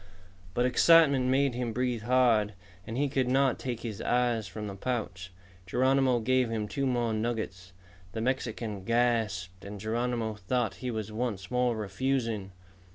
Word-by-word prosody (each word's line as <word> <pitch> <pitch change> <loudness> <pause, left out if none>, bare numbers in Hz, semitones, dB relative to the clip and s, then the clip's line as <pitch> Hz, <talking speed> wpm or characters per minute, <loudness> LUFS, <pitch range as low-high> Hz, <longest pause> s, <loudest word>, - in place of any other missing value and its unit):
But 120 - +2
excitement 140 -1 +5
made 135 0 +2
him 120 -2 -3
breathe 125 -2 -1
hard, 115 -3 +3 0.3
and 115 - -4
he 145 +1 +2
could 135 -2 0
not 135 0 +2
take 120 -3 -4
his 110 -3 -5
eyes 120 -4 +1
from 105 +2 -6
the 100 - -5
pouch. 95 -5 -4 0.4
Geronimo 130 +2 +2
gave 130 +1 +2
him 110 -2 -2
two 140 +4 -1
more 120 -3 0
nuggets. 110 -5 -3 0.4
The 110 - -3
Mexican 115 -5 -2
gasped 110 -6 0
and 100 +1 -7
Geronimo 115 +1 -1
thought 105 +1 -2
he 125 - -4
was 110 -2 -4
once 110 -5 -3
more 125 -2 +1
refusing. 110 -1 -2
120 Hz, 155 wpm, -29 LUFS, 105-125 Hz, 0.4 s, excitement